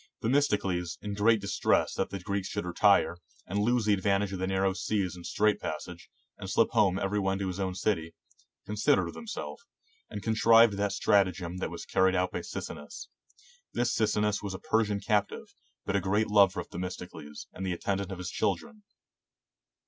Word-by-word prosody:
Themistocles, 105 -9 +1
in 105 -1 -3
great 110 +2 +3
distress 100 0 +1
that - - -1
the 100 - -5
Greeks 100 +1 -3
should - - -4
retire, 90 0 +3 0.3
and 100 +3 -2
lose 120 +2 +2
the 105 - +4
advantage 100 0 +1
of 95 - -4
the 95 - -1
narrow 95 0 +1
seas 95 -2 -1
and 90 - -11
strait 105 +1 +2
passage, - - -6 0.3
and 95 - -6
slip 110 +3 +3
home 105 -5 +3
every 100 +1 -1
one 95 -1 0
to 100 -1 -2
his 95 +1 -4
own 95 -1 -2
city, 85 -5 -1 0.5
considered 105 +8 +2
with - - -6
himself, 235 0 -6 0.5
and 105 - -6
contrived 115 +1 +5
that 100 0 -1
stratagem 90 -3 +1
that 90 - -3
was - - -7
carried 95 0 +2
out 90 0 +1
by - - -3
Sicinnus. 75 0 -7 0.6
This 120 -1 0
Sicinnus 105 -1 +1
was 100 -2 -4
a - - -7
Persian 105 -2 0
captive, 105 -1 -1 0.3
but 100 - -1
a 100 - +2
great 100 +4 +1
lover 100 -3 +5
of 90 - -6
Themistocles, 90 -4 -7
and 95 - -6
the 95 -1 -1
attendant 100 +2 -2
of 95 - -5
his 90 0 -5
children. 230 -3 -2
100 Hz, 180 wpm, -29 LUFS, 95-105 Hz, 0.6 s, contrived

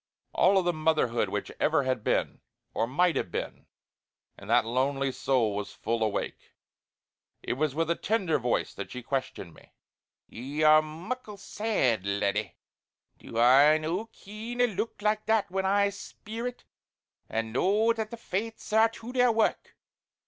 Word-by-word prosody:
All 195 -2 +4
the 175 0 +1
motherhood 155 -7 +1
which - - -4
ever 140 - +2
had 130 -4 -1
been, - - 0 0.3
or 115 - 0
might 170 +7 +2
have - - -1
been, - - -5 0.7
in - - -13
that 120 +1 +3
lonely 135 +3 0
soul 125 -6 0
was 105 0 -5
full 115 +1 -2
awake. 110 -2 -3 0.9
It - - -1
was 145 +1 -1
with 165 +1 0
a - - +2
tender 190 -8 0
voice 120 -1 -1
that 100 - -7
she 125 -1 -7
questioned 130 - -4
me: - - -20 0.5
"Ye 140 +6 -4
are 155 0 +7
muckle 200 +8 -7
sad 195 - 0
laddie. 100 -1 -1 0.6
Do 115 - -8
I 135 +6 +6
no 170 +8 -3
ken 220 +3 -9
a - - +6
look 220 -1 -4
like 215 0 0
that 220 -3 +2
when 190 0 0
I 200 +1 +3
speer 225 +4 -7
it, 245 - -8 0.7
and 110 0 -3
know 210 - +3
that 220 -2 -4
the 235 - -7
Fates 220 +1 -5
are 220 +1 +5
to 230 +2 -10
their 250 -1 +4
wark. 225 -1 0
155 Hz, 160 wpm, -28 LUFS, -, 0.9 s, are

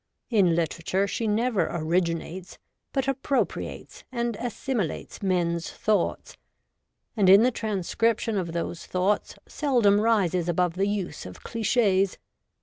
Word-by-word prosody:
In 190 -7 +4
literature 170 +3 0
she 225 +2 -2
never 220 0 +1
originates, 170 +2 -2 0.3
but 270 -1 -1
appropriates 275 0 -2
and 235 -1 -1
assimi 240 -4 -2
lates - - -8
men's 175 -3 0
thoughts, 210 -4 -1 0.8
and 200 -5 +4
in 200 +3 +8
the 250 - +3
transcription 220 +1 0
of 180 -4 -2
those 170 0 -4
thoughts 185 +3 0
seldom 235 -9 +2
rises 185 -6 +2
above 175 0 +1
the 195 +3 0
use 195 - -3
of 90 - -12
clichis. 205 -4 +1
195 Hz, 125 wpm, -26 LUFS, 175-230 Hz, 0.8 s, in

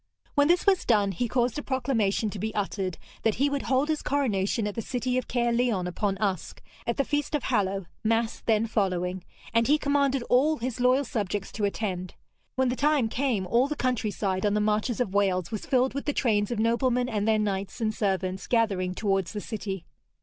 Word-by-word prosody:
When 290 0 +4
this 350 +2 +3
was 390 -2 +4
done, 205 -4 +3
he 235 +7 -1
caused 245 +2 0
a - - -3
proclamation 225 -7 0
to 205 - -6
be 220 +3 -3
uttered, 195 -4 -2 0.2
that 220 -2 +1
he 280 +3 +1
would 280 -1 -1
hold 265 +2 +1
his 310 -1 0
coronation 225 -6 0
at 210 - -2
the 230 - -3
city 250 +2 -2
of 255 - -1
Caerleon 235 -5 +1
upon 195 +2 -1
Usk, 195 -4 -2 0.3
at 235 - 0
the 275 - +1
feast 290 +1 -1
of 290 - -1
Hallow 195 -5 0 0.2
mass 225 +1 0
then 220 -1 +2
following; 185 -4 -1 0.3
and 230 0 +3
he 295 +3 +5
commanded 280 -3 +1
all 285 +6 +3
his 250 +1 -4
loyal 255 +3 +4
subjects 205 -6 -3
to 210 - -1
attend. 185 -3 -3 0.4
When 260 -1 +2
the 245 - -1
time 285 -4 +2
came, 240 -6 0
all 235 +8 +3
the 300 - -3
countryside 215 -7 -1
on 205 0 +2
the - - +2
marches 215 +3 0
of 205 -6 -1
Wales 185 -3 +1
was 215 - -5
filled 260 0 +2
with 280 - -4
the 290 - 0
trains 210 -6 +1
of 240 - -2
noblemen 245 +2 +2
and 215 -3 -1
their 220 -1 +4
knights 200 0 -2
and 220 -2 0
servants 190 -3 -1
gathering 195 -6 +1
towards 195 -4 0
the 210 - -3
city. 195 -5 -5
225 Hz, 205 wpm, -27 LUFS, 200-255 Hz, 0.4 s, he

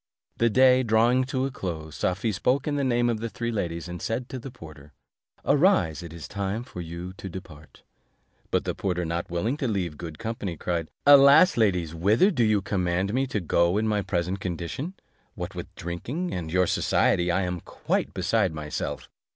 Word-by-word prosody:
The 115 - +3
day 130 +2 +5
drawing 120 +2 +3
to 130 0 -1
a 135 - -3
close, 80 - -6
Safie 95 +5 0
spoke 125 +8 0
in 145 - 0
the 140 - 0
name 120 -2 +2
of 115 -2 0
the 115 +1 -3
three 115 +1 -3
ladies, 85 -6 -3
and 90 -1 -7
said 120 +3 -3
to 130 - -5
the 135 - -8
porter, 80 - -13 0.5
"Arise, 140 - +3
it 85 -2 -8
is 85 -1 -8
time 100 +3 -3
for 90 -7 -8
you 85 +2 -7
to 95 - -7
depart." 80 -5 -11 0.7
But - - +1
the - - -2
porter, 90 -2 -2
not 85 +1 -3
willing 105 +11 -1
to 135 - -1
leave 90 -9 -2
good 80 -3 -7
company, 110 -6 -4
cried, 85 -1 -2 0.2
"Alas! 140 +5 +8
ladies, 90 -8 +1
whither 105 - +3
do 125 -10 +1
you 105 -3 +2
command 95 0 0
me 135 +2 +1
to 110 - -2
go 85 +1 +2
in 110 +1 +1
my 105 -1 +1
present 90 0 -2
condition? 95 - -4 0.4
What - - -5
with - - -6
drinking 125 - -4
and 80 -3 -4
your 90 +1 +3
society, 90 0 +2
I 95 +2 +1
am 90 -1 -2
quite - - -2
beside 100 -8 0
myself. 75 -1 -4
100 Hz, 190 wpm, -26 LUFS, 85-120 Hz, 0.7 s, Alas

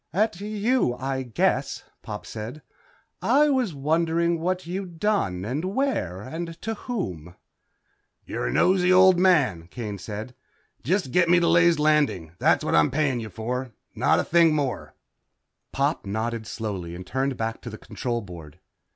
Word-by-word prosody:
"At 205 0 0
you, 215 - 0
I 130 +1 -3
guess," 120 -5 0 0.2
Pop 105 -1 -7
said, 115 +7 -7 0.6
"I 300 +1 +4
was 250 - 0
wondering 165 +3 +1
what 180 +2 -1
you'd 175 -1 -6
done 105 - 0
and 135 +8 -2
where 230 - -1
and 165 +7 -6
to 225 - -2
whom." 90 - -5 0.9
"You're - - -3
a - - -1
nosey 180 - +3
old 185 -1 +6
man," 145 - +3
Kane 105 -1 -6
said. 110 +5 -6 0.5
"Just 185 -4 0
get 180 +2 +3
me 175 0 +6
to 170 - +2
Ley's 170 -1 +5
Landing. 150 - +2
That's - - +3
what - - -1
I'm 80 -1 +5
paying 130 -5 -1
for, 125 +3 -4 0.2
not - - +2
a - - +1
thing 165 -2 +4
more." 140 -4 -3 0.8
Pop - - 0
nodded 110 +2 -3
slowly 95 -7 -5
and 90 +1 -8
turned 130 +4 -1
back 115 0 -3
to 120 - -7
the 110 - -8
control 120 +1 -4
board. 85 -7 -11
140 Hz, 155 wpm, -25 LUFS, 110-175 Hz, 0.9 s, old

